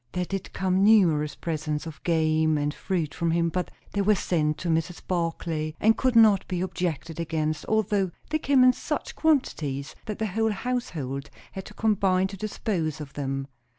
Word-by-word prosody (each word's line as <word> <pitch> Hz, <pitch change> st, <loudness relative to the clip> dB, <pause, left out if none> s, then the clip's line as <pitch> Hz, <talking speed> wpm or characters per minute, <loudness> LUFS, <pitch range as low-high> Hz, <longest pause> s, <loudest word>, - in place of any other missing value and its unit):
There 180 Hz, 0 st, -1 dB
did 195 Hz, +1 st, -5 dB
come 190 Hz, 0 st, +1 dB
numerous 165 Hz, -9 st, +4 dB
presents 155 Hz, -2 st, -3 dB
of 160 Hz, -3 st, -9 dB
game 155 Hz, -2 st, +2 dB
and 145 Hz, 0 st, -1 dB
fruit 170 Hz, -6 st, -2 dB
from 170 Hz, -, -1 dB
him, 170 Hz, 0 st, +2 dB
but 180 Hz, +2 st, -2 dB, 0.2 s
they 200 Hz, -, 0 dB
were 210 Hz, +2 st, +4 dB
sent 155 Hz, -5 st, 0 dB
to 175 Hz, -, -5 dB
Mrs. 165 Hz, +1 st, -1 dB
Barclay, 165 Hz, -3 st, -2 dB
and 220 Hz, +1 st, +4 dB
could 255 Hz, -2 st, +1 dB
not 215 Hz, -4 st, +6 dB
be 180 Hz, -2 st, -2 dB
objected 170 Hz, -3 st, -3 dB
against, 155 Hz, -2 st, -2 dB
although 210 Hz, -3 st, +1 dB, 0.2 s
they 310 Hz, -, +1 dB
came 275 Hz, -3 st, +4 dB
in 255 Hz, 0 st, +7 dB
such -, -, -4 dB
quantities 150 Hz, -, 0 dB
that 210 Hz, -, -3 dB
the 220 Hz, -, -1 dB
whole 220 Hz, +2 st, 0 dB
household 160 Hz, -, -3 dB, 0.2 s
had 190 Hz, -, -7 dB
to 210 Hz, -, -12 dB
combine 195 Hz, -4 st, +2 dB
to 195 Hz, -, -7 dB
dispose 190 Hz, -6 st, -2 dB
of 145 Hz, -2 st, -8 dB
them. 135 Hz, -1 st, -3 dB
175 Hz, 180 wpm, -26 LUFS, 155-205 Hz, 0.2 s, in